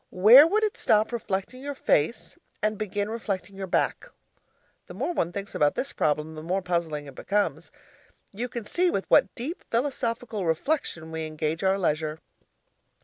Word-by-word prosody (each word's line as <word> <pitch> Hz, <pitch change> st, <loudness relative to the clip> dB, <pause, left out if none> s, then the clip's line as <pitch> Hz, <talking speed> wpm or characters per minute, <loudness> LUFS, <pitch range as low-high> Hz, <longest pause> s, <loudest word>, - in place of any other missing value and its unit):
Where 235 Hz, -, +8 dB
would 425 Hz, +5 st, +1 dB
it 425 Hz, -, 0 dB
stop 215 Hz, +2 st, +2 dB
reflecting 225 Hz, +1 st, -3 dB
your 285 Hz, +1 st, -5 dB
face 155 Hz, -, 0 dB, 0.2 s
and 215 Hz, 0 st, 0 dB
begin 205 Hz, -1 st, -2 dB
reflecting 200 Hz, -4 st, -4 dB
your 195 Hz, 0 st, -5 dB
back? -, -, 0 dB, 0.8 s
The -, -, -10 dB
more 350 Hz, -, -2 dB
one 170 Hz, -, 0 dB
thinks 200 Hz, +2 st, -6 dB
about 145 Hz, -1 st, +2 dB
this 275 Hz, -, -3 dB
problem, 150 Hz, +1 st, 0 dB
the 155 Hz, -, -8 dB
more 180 Hz, +4 st, -1 dB
puzzling 170 Hz, -4 st, -2 dB
it 140 Hz, -, -10 dB
becomes. 205 Hz, +9 st, -1 dB, 0.6 s
You 235 Hz, +5 st, -4 dB
can 235 Hz, -3 st, -6 dB
see 360 Hz, +10 st, +1 dB
with 195 Hz, -, -1 dB
what -, -, +4 dB
deep 290 Hz, +9 st, -5 dB
philosophical 235 Hz, -4 st, -2 dB
reflection 165 Hz, -, -1 dB
we 160 Hz, -1 st, -3 dB
engage 155 Hz, +1 st, -3 dB
our 190 Hz, +1 st, +3 dB
leisure! 155 Hz, -3 st, -1 dB
195 Hz, 165 wpm, -26 LUFS, 160-235 Hz, 0.8 s, Where